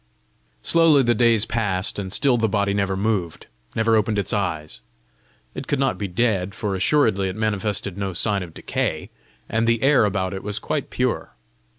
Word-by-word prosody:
Slowly 165 -4 +4
the 120 -1 +3
days 115 -2 +3
passed, 105 -5 -1
and 95 -2 -5
still 135 +5 +3
the 115 -2 +1
body 100 0 0
never 100 -2 -1
moved, 95 -5 -2 0.3
never 110 0 +2
opened 105 0 +1
its 100 - 0
eyes. 80 -7 -3 0.7
It 130 - -7
could 145 - 0
not 135 0 0
be 100 - -2
dead, 100 -1 0
for 105 -3 -3
assuredly 100 -1 +2
it 95 - -6
manifested 105 -2 -1
no 95 -2 -2
sign 100 +2 +1
of 85 -3 -9
decay, - - -3 0.4
and 115 +1 0
the 115 0 +1
air 135 -5 +5
about 95 -2 -1
it 95 - -5
was 105 0 -3
quite - - -3
pure. - - -2
105 Hz, 180 wpm, -22 LUFS, 95-115 Hz, 0.7 s, air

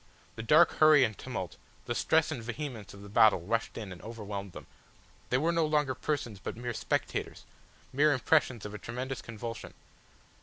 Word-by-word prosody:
The - - -5
dark 155 +9 +6
hurry 155 -3 +7
and 110 -4 0
tumult, 95 -10 -6 0.3
the 120 - -1
stress 160 +6 +2
and 135 -7 -4
vehemence 120 -4 -6
of 100 - -12
the - - -10
battle 105 -1 +5
rushed 115 +6 -2
in 105 -4 -6
and 90 - -9
overwhelmed 100 -4 -6
them. - - -9 0.6
They 125 - +3
were 160 +5 +2
no 165 -1 +2
longer 150 -3 +1
persons 125 -7 -3
but 100 - -6
mere 120 0 -4
spectators, 110 - -2 0.5
mere 150 +3 +4
impressions 130 -4 +2
of 105 - -6
a 105 - -6
tremendous 130 +3 -5
convulsion. 115 0 -7
120 Hz, 180 wpm, -30 LUFS, 105-145 Hz, 0.6 s, hurry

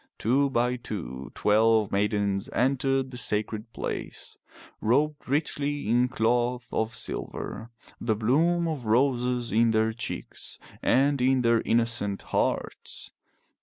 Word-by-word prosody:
Two 135 +5 +2
by 125 -1 +1
two 75 - -6
twelve 110 0 +3
maidens 100 -1 0
entered 135 +1 +1
the 125 - -5
sacred 110 0 -1
place, - - -5 0.5
robed 145 +5 +1
richly 145 -2 -1
in 120 +3 +3
cloth 120 0 0
of 110 0 -1
silver, 110 0 -4 0.3
the 110 -2 0
bloom 165 +10 +2
of 145 -8 -4
roses 125 0 +1
in 115 +2 +4
their 110 0 +2
cheeks 115 +1 -6 0.2
and 140 +1 +3
in 130 0 +3
their 115 -1 +3
innocent 115 -4 0
hearts. - - -2
120 Hz, 120 wpm, -27 LUFS, 110-135 Hz, 0.5 s, in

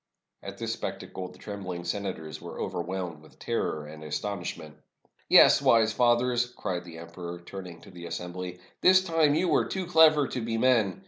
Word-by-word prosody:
At - - -8
this - - -3
spectacle 95 -1 -6
the - - -15
trembling 95 -4 -6
senators 85 -4 -4
were - - -8
over - - -3
whelmed 90 -3 -5
with 80 - -19
terror 75 -1 -2
and 75 +1 -10
astonishment. 80 -2 -5 0.5
"Yes, - - +7
wise 110 -1 +4
fathers," 120 0 +2
cried 90 -1 -3
the 85 -2 -10
emperor, 85 +1 -8
turning 90 -2 -9
to - - -14
the 85 -1 -9
assembly, 90 +1 -6 0.2
"this 185 0 +6
time 165 -4 +2
you 175 +3 +1
were 160 - +3
too 190 -1 -3
clever 160 -4 +5
to 125 - -3
be 115 0 -2
men. 115 -6 +2
95 Hz, 175 wpm, -28 LUFS, 85-120 Hz, 0.5 s, Yes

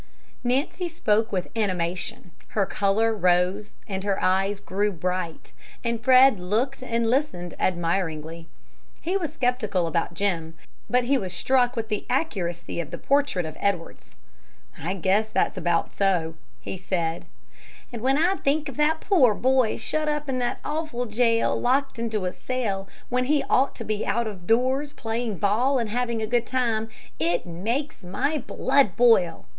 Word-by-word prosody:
Nancy 275 +8 0
spoke 220 -9 +1
with 185 +2 -3
animation, 185 +1 -2 0.3
her 200 - +4
color 210 +4 +1
rose 185 +1 +1
and 190 -2 -3
her 200 -1 0
eyes 195 +2 +1
grew 205 +2 -1
bright, 180 -1 -4 0.3
and 235 -1 -2
Fred 260 -4 +6
looked 230 +10 -1
and 230 -2 0
listened 225 - 0
admiringly. 165 -2 -1 0.5
He 360 +4 -1
was 330 -6 -1
skeptical 245 - 0
about 165 +1 -1
Jim, 165 -4 -1 0.3
but 250 0 +3
he 265 +2 +2
was 185 -3 -4
struck 250 +5 +2
with 225 -1 -3
the 210 -2 -3
accuracy 180 - -2
of 160 - -8
the 170 - -6
portrait 280 - +1
of 155 0 -6
Edwards. 185 -5 -3 0.6
"I 175 +6 -2
guess 195 +4 +1
that's - - +1
about 175 -2 0
so," 180 -5 +1 0.3
he 190 - -6
said. 170 -3 -2 0.7
"And 235 - -5
when 265 +3 +2
I 355 +5 +2
think 295 +2 0
of 265 - -9
that 310 +1 +2
poor 265 - +4
boy 255 -2 +2
shut 310 0 -1
up 300 0 -2
in 260 -1 -1
that 245 -1 -1
awful 300 -5 -2
jail, 230 +1 +2
locked 265 +1 +1
into 220 -4 -2
a 180 - -2
cell, 210 -7 -3 0.2
when 250 0 +1
he 290 +1 +2
ought 270 +2 +3
to 230 - -6
be 215 -1 -2
out 235 +4 0
of 190 -5 -7
doors 260 +5 +2
playing 225 -2 -3
ball 225 +8 +2
and 230 -4 -2
having 235 -1 -1
a - - +1
good 235 +1 0
time, 230 -4 0 0.3
it 170 +2 0
makes 225 - -3
my 275 - -1
blood 265 -5 +1
boil!" 225 -9 +4
220 Hz, 160 wpm, -25 LUFS, 185-255 Hz, 0.7 s, Fred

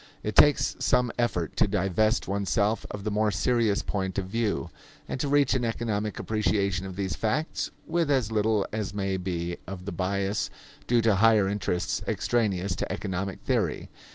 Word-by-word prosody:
It 105 - -3
takes 145 -1 +5
some 125 -2 +2
effort 90 -9 0
to - - +4
divest 105 +3 +1
oneself 100 +2 0
of 105 -1 -6
the 105 - -2
more 105 +1 +2
serious 115 -1 +1
point 95 -2 -3
of 95 - 0
view, 100 -8 -1 0.4
and - - -4
to 145 - 0
reach 140 -2 +3
an 130 -2 0
economic 110 -2 -2
appreciation 100 -4 0
of 95 - -7
these 95 -1 -2
facts, 135 +9 -1 0.2
with 170 -3 0
as 130 -6 +2
little 110 -1 +2
as 105 -2 -3
may 95 -1 -1
be 85 -2 -3
of 95 -1 -7
the 100 - -4
bias 95 +3 -1 0.4
due 120 -1 +3
to 110 -3 +3
higher 110 -1 +5
interests 95 -3 -1
extraneous 100 -6 0
to - - -3
economic 95 0 -3
theory. - - -1
105 Hz, 170 wpm, -27 LUFS, 95-115 Hz, 0.4 s, takes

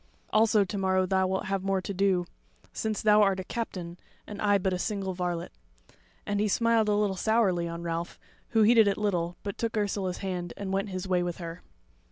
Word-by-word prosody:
Also 215 -1 +4
to 195 +2 -5
morrow 190 -1 +2
thou 190 0 +1
wilt 190 0 -2
have 195 0 -1
more 195 0 +1
to 195 +2 -5
do; 190 -2 +2 0.5
since 220 -1 -2
thou 210 0 +6
art 195 -2 +3
a - - -3
captain, 180 -6 -5 0.3
and 205 -1 -8
I 205 -1 +4
but 190 -1 -1
a 180 - -2
single 195 -1 -2
varlet." 175 -2 -3 0.7
And 205 0 -1
he 210 - +2
smiled 230 +1 +2
a 205 - +3
little 205 -2 +1
sourly 190 -4 +2
on 170 0 -6
Ralph; 170 0 -3 0.3
who 225 -2 +3
heeded 225 0 +6
it 200 - +1
little, 175 -5 -1
but 200 -1 -5
took 230 -1 -2
Ursula's 200 -3 -1
hand 180 -3 -4
and 195 -1 -4
went 195 +1 -1
his 185 0 -4
way 180 -1 +2
with 175 -1 -3
her. 170 0 -7
195 Hz, 210 wpm, -28 LUFS, 180-210 Hz, 0.7 s, thou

